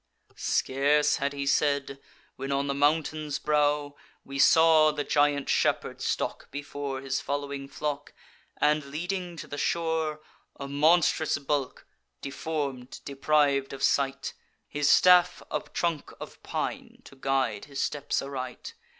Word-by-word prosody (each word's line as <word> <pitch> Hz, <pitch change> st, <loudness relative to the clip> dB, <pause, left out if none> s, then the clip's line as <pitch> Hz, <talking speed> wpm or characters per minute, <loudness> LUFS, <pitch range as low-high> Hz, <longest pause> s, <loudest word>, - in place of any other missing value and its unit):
"Scarce 145 Hz, +3 st, +2 dB
had 140 Hz, +1 st, -1 dB
he 140 Hz, 0 st, -4 dB
said, 140 Hz, -1 st, +1 dB, 0.4 s
when 135 Hz, +1 st, -5 dB
on 140 Hz, 0 st, +1 dB
the 140 Hz, -, -1 dB
mountain's 150 Hz, 0 st, 0 dB
brow 145 Hz, -1 st, +1 dB, 0.3 s
We 135 Hz, 0 st, -6 dB
saw 160 Hz, +1 st, +6 dB
the 150 Hz, -1 st, -2 dB
giant 145 Hz, -1 st, +2 dB
shepherd -, -, 0 dB
stalk -, -, -2 dB
before 145 Hz, -1 st, -5 dB
His 135 Hz, 0 st, -2 dB
following 140 Hz, -1 st, -4 dB
flock, 145 Hz, 0 st, -4 dB, 0.5 s
and 150 Hz, 0 st, +2 dB
leading 175 Hz, +4 st, -4 dB
to -, -, -7 dB
the 145 Hz, -, -6 dB
shore: 160 Hz, -2 st, -1 dB, 0.4 s
A 140 Hz, -, -5 dB
monstrous 155 Hz, +2 st, +3 dB
bulk, 140 Hz, -1 st, -2 dB, 0.3 s
deform'd, 140 Hz, -3 st, -4 dB
depriv'd 140 Hz, -1 st, +1 dB
of 135 Hz, -, -6 dB
sight; 140 Hz, -1 st, +1 dB, 0.3 s
His 145 Hz, -1 st, 0 dB
staff 180 Hz, -1 st, +5 dB
a -, -, 0 dB
trunk 170 Hz, -4 st, -2 dB
of -, -, -10 dB
pine, -, -, -5 dB
to -, -, -14 dB
guide 130 Hz, -6 st, -1 dB
his 140 Hz, -1 st, -7 dB
steps 145 Hz, -1 st, -2 dB
aright. 130 Hz, -2 st, -6 dB
145 Hz, 135 wpm, -27 LUFS, 140-150 Hz, 0.5 s, saw